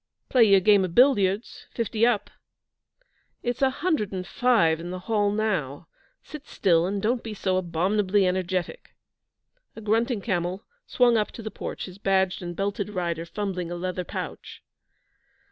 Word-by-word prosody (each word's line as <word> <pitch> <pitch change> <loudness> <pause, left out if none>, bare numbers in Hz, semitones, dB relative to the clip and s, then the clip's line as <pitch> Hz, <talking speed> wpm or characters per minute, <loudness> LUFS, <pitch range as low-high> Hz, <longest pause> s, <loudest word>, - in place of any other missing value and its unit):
'Play 245 -3 +5
you 200 -2 +6
game 200 0 +4
o' - - 0
billiards 205 0 +2
fifty 230 0 0
up.' 235 -4 0 1.1
'It's 245 +1 -2
a 270 - +4
hundred 285 - -1
and 185 -2 -4
five 180 -9 +2
in 170 +1 -6
the 180 0 -6
hall 210 -3 +1
now. 185 -9 -2 0.4
Sit 300 -2 -10
still 170 -2 +2
and 200 +1 -2
don't 230 +4 0
be 220 -2 -7
so 190 -2 -1
abominably 185 +3 +1
energetic.' 185 - -2 0.8
A 220 - -9
grunting 225 +2 +1
camel 180 -2 -2 0.2
swung 240 -2 +3
up 210 - 0
to 225 - -9
the 220 - -5
porch, - - -6
his 185 +1 -12
badged 190 -2 +1
and 175 -1 -6
belted 200 +1 -2
rider 170 -4 -3
fumbling 185 -2 -4
a 175 - -4
leather 180 +1 -3
pouch. - - -7
195 Hz, 160 wpm, -25 LUFS, 180-220 Hz, 1.1 s, you